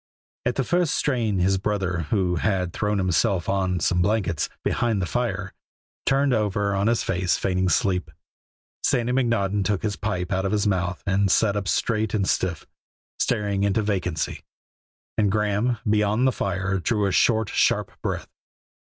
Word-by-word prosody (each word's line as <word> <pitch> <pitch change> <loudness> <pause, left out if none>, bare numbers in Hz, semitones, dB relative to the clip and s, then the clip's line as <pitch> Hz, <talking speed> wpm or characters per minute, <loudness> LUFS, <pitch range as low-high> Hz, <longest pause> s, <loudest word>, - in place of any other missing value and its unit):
At 125 - 0
the 135 - 0
first 175 +3 +1
strain 115 -8 0
his 95 +1 +2
brother, 95 -5 -1
who 90 -4 +1
had 90 -2 0
thrown 105 -1 0
himself 95 0 +1
on 95 -2 0
some 90 +2 +1
blankets 95 -5 0
behind 115 -4 0
the 95 - 0
fire, 100 -4 -2 0.5
turned 135 0 +3
over 105 -2 0
on 100 +2 +1
his 115 0 +2
face 90 -1 0
feigning 95 -1 0
sleep. 90 +1 +1 0.7
Sandy 120 0 +1
McNaughton 115 -6 +1
took 100 -1 -1
his 105 -2 -1
pipe 100 -3 -3
out 95 +1 0
of 95 +1 -1
his 105 -1 +1
mouth 90 -3 -1
and 100 0 +2
sat 100 +2 +3
up 100 -2 -2
straight 110 +5 0
and 100 -2 0
stiff, 90 -3 -1 0.5
staring 100 -2 0
into 100 +2 +1
vacancy, 90 -6 -2 0.8
and 105 -2 +3
Graeme, 105 +3 +1
beyond 105 +3 +2
the 130 - +4
fire, 95 -3 -1
drew 105 +2 0
a 100 - +1
short, 110 +3 +3
sharp - - +1
breath. - - -3
100 Hz, 160 wpm, -24 LUFS, 95-110 Hz, 0.8 s, the